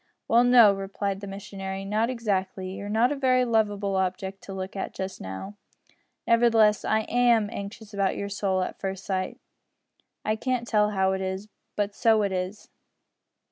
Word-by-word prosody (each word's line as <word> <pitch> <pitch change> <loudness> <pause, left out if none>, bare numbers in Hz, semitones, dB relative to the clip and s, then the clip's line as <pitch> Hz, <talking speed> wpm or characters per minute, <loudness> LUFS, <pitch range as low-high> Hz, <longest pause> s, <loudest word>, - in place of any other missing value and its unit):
"Well, 235 +1 +5
no," 240 -4 +7
replied 195 0 -3
the 200 - -6
missionary, 195 -1 -6
"not 215 +4 +1
exactly. 195 -6 -2
You're 200 +2 -6
not 225 +5 +3
a - - 0
very 255 -2 +3
lovable 205 -4 +1
object 190 +1 -2
to - - -8
look 190 0 -5
at 195 - -4
just 190 0 -5
now. 95 - -7 0.7
Nevertheless, 230 -3 +4
I 220 0 +2
am 235 -2 +2
anxious 210 +2 -8
about 195 -1 0
your 200 - -3
soul 195 -2 0
at - - -6
first 195 -1 -4
sight. 185 -1 -2 0.9
I 215 0 +1
can't 250 0 -1
tell 210 -2 +3
how 190 -2 +1
it 190 0 -2
is, 190 +2 -4 0.3
but 205 -1 -1
so 220 0 +3
it 200 - 0
is." 185 +3 -4
200 Hz, 170 wpm, -26 LUFS, 190-220 Hz, 0.9 s, no